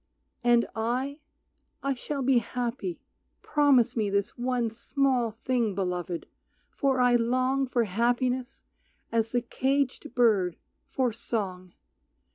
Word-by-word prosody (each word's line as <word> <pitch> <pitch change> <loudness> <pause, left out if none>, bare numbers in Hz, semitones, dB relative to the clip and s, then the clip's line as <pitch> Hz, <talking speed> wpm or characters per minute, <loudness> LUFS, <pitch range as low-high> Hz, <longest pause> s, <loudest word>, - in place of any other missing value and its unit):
And 240 -1 +4
I, 250 +6 -1 0.6
I 275 0 +1
shall 275 +2 -4
be 255 -1 +4
happy, 235 -6 -4 0.4
promise 275 -5 +3
me 215 -3 +1
This 200 0 0
one 245 -2 -1
small 250 +1 +1
thing, 225 -1 -1
Beloved, 180 -2 -2 0.5
for 270 -3 +1
I 245 -1 +5
long 255 +3 +1
For 245 -1 +1
happiness 245 +5 0 0.5
as 225 -1 +1
the 245 -1 +1
caged 265 0 -1
bird 210 -8 +3 0.3
for 255 -4 0
song. 185 -5 -4
240 Hz, 115 wpm, -28 LUFS, 220-255 Hz, 0.6 s, I